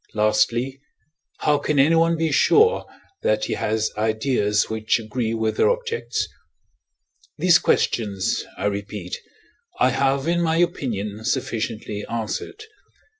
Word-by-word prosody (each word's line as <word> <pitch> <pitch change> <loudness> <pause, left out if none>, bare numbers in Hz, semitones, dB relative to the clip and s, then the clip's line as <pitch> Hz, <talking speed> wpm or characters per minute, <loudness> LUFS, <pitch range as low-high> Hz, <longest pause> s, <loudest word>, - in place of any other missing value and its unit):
Lastly, 120 +5 +1 0.6
how 150 -1 +3
can 150 0 -1
anyone 165 +4 +4
be 160 -1 0
sure, 450 - +4 0.3
that 110 0 +1
he - - -2
has 110 0 -1
ideas 110 -1 +1
which 110 0 0
agree 115 +1 -2
with 110 -1 -1
their - - +4
objects? 475 -1 -2 1.1
These 175 -1 +5
questions, 100 -4 0
I 95 - -3
repeat, 100 -2 -3 0.6
I 130 - +4
have, 135 +2 +1
in 175 +1 +2
my 165 -1 +1
opinion, 110 - -1
sufficiently 110 -2 -2
answered. 115 - -4
115 Hz, 120 wpm, -23 LUFS, 110-160 Hz, 1.1 s, These